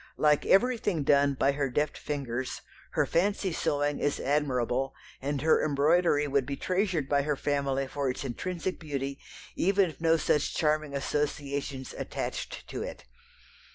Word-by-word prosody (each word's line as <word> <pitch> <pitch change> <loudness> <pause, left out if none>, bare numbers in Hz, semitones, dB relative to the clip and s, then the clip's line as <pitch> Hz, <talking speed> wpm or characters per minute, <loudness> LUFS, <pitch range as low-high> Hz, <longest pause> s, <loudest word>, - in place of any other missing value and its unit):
Like 150 -1 +3
everything 205 - +3
done 140 0 +4
by 135 +1 +3
her 140 -1 -1
deft 150 +4 0
fingers, 130 -4 -4 0.3
her - - +2
fancy 190 +1 +1
sewing 145 -1 0
is 145 - 0
admirable, 135 -2 0 0.3
and 140 +1 -1
her 160 - +4
embroidery 150 +1 +3
would 140 -2 +1
be 140 - -2
treasured 180 -4 0
by 140 0 +3
her 150 +1 0
family 140 -1 0
for 140 0 -2
its 125 - -3
intrinsic 180 +8 -3
beauty 140 -3 -4 0.4
even 195 -1 +3
if 155 - -18
no 165 0 +4
such 150 -2 +1
charming 155 -2 +1
associations 140 -1 -2
attached - - -5
to - - -4
it. - - -7
145 Hz, 150 wpm, -29 LUFS, 140-160 Hz, 0.4 s, done